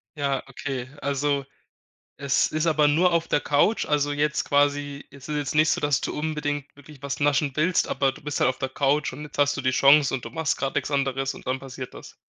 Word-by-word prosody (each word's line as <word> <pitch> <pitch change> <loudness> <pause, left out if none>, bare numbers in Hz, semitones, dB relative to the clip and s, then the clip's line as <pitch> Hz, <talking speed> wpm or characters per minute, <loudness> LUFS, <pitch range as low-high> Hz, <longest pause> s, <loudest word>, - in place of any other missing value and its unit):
Ja, 140 -2 -1
okay. 130 -1 -5
Also, 140 0 0 0.7
es 140 -1 +2
ist 155 +1 0
aber 150 -2 +4
nur 170 +5 +3
auf 165 0 +1
der - - +2
Couch? 145 +10 +2
Also, 145 -1 +1
jetzt 150 +1 0
quasi, 145 0 0
es 140 0 -12
ist 150 - -2
jetzt 145 +1 -2
nicht 155 +1 +4
so, - - +1
dass 145 -3 +1
du - - -3
unbedingt 150 -2 -2
wirklich 145 0 -15
was 140 +1 -4
naschen 145 0 +2
willst, 165 +4 +2
aber 135 -1 +1
du - - -14
bist 150 -1 -3
halt 125 - +4
auf 130 - -4
der 130 - -2
Couch 140 +1 0
und 150 +3 -8
jetzt 150 - -10
hast 145 0 +3
du - - -2
die 130 -1 +1
Chance 140 +1 +5
und 125 -3 -3
du - - -5
machst 160 +3 -1
grad 135 -1 -3
nix - - -1
anderes 135 -1 0
und - - -13
dann 130 +1 -1
passiert 130 -1 -8
das? - - -12
145 Hz, 235 wpm, -25 LUFS, 135-150 Hz, 0.7 s, Chance